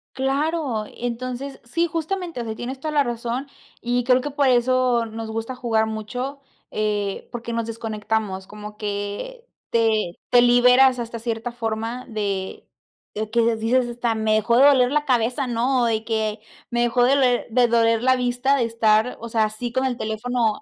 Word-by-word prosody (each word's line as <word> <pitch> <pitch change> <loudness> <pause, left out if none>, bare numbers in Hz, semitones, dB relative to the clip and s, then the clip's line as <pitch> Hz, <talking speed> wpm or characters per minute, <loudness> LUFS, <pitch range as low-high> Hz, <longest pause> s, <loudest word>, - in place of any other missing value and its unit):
Claro, 270 -3 -1
entonces, 255 +3 -5
sí, 335 +8 0
justamente. 335 -1 -3
O 235 - -3
sea, 220 -1 -4
tienes 255 +4 -6
toda 310 +2 -4
la 290 -1 +4
razón, 240 +2 -3 0.3
y 245 0 0
creo 255 0 +4
que 290 +3 -4
por 280 -1 +2
eso 250 -1 +3
nos 225 0 -6
gusta 225 +3 -4
jugar 225 -3 +1
mucho, 245 +6 -5 0.3
eh, 205 -2 -2
porque 235 0 -5
nos 230 -1 -1
desconectamos, 215 -3 -3
como 210 0 -10
que 205 - -5 0.3
te 220 -6 +1
te 245 - +6
liberas 250 +1 +5
hasta 230 0 -5
cierta 230 +1 -3
forma 230 +1 -4
de 200 -4 -3 0.5
de 215 0 -3
que 230 0 +2
dices: 240 +3 +1
"Hasta 240 -1 -1
me 220 0 +1
dejó 220 +2 +2
de 255 - +6
doler 260 -3 +5
la 300 0 +2
cabeza", 255 0 +1
¿no?, 245 +2 +1
de 225 -1 0
que: 220 -2 -1 0.3
"Me 240 0 +1
dejó 240 +1 +2
de 265 +3 +4
ler 250 -3 +2
de 245 +1 +3
doler 230 -1 +3
la 260 +1 +4
vista 250 +2 +1
de 265 - +1
estar, 225 0 +2
o 235 - -7
sea, 225 -1 +1
así 215 +3 -3
con 260 - +1
el 255 -2 -1
teléfono". 220 0 -1
235 Hz, 180 wpm, -23 LUFS, 220-255 Hz, 0.5 s, te